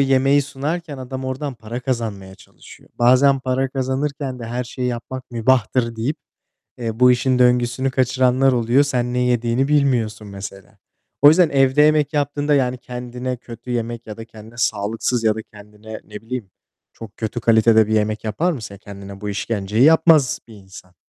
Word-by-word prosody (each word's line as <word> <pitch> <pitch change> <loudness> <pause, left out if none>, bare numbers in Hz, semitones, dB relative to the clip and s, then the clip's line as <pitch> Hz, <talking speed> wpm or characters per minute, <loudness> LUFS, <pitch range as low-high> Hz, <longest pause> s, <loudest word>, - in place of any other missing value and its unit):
yemeği 135 +1 +3
sunarken 145 +2 -5
adam 130 +1 -6
oradan 130 +1 -4
para 115 +2 -7
kazanmaya 110 -7 -4
çalışıyor. - - -17
Bazen 130 +3 +4
para 130 +1 -1
kazanırken 135 0 -3
de 115 - -7
her 120 +2 -3
şeyi 125 +1 -4
yapmak 125 +2 -6
mübahtır 115 0 +1
deyip, 125 +7 -2 0.6
eee, 115 -1 -4
bu 125 0 +7
işin 125 +1 +2
döngüsünü 125 +1 +2
kaçıranlar 130 0 +2
oluyor. 120 +3 +3
Sen 125 -3 -1
ne 125 - 0
yediğini 125 +2 +1
bilmiyorsun 120 -8 +1
mesela. 100 -1 -10 0.4
O 145 - +10
yüzden 165 +1 +5
evde 135 +1 +3
yemek 150 0 +3
yaptığında, 145 0 0
yani, 130 -2 +1
kendine 125 +1 -6
kötü 120 0 -11
yemek 120 -1 -3
ya 105 0 -8
da 115 - -8
kendine 110 0 -14
sağlıksız 115 +1 -1
ya 110 -1 +3
da 110 - -6
kendine 105 +1 -12
ne 105 - -17
bileyim 115 -3 -6 0.4
çok 110 -3 -12
kötü 115 +2 -4
kalitede 110 -1 +4
bir 110 - -3
yemek 110 +1 0
yapar 160 +12 0
mısın? 105 -7 -8
Kendine 100 0 -10
bu 105 - -5
işkenceyi 105 +2 -1
yapmaz 160 -3 +5
bir 110 - -13
insan. 95 -2 -14
125 Hz, 165 wpm, -20 LUFS, 110-135 Hz, 0.6 s, O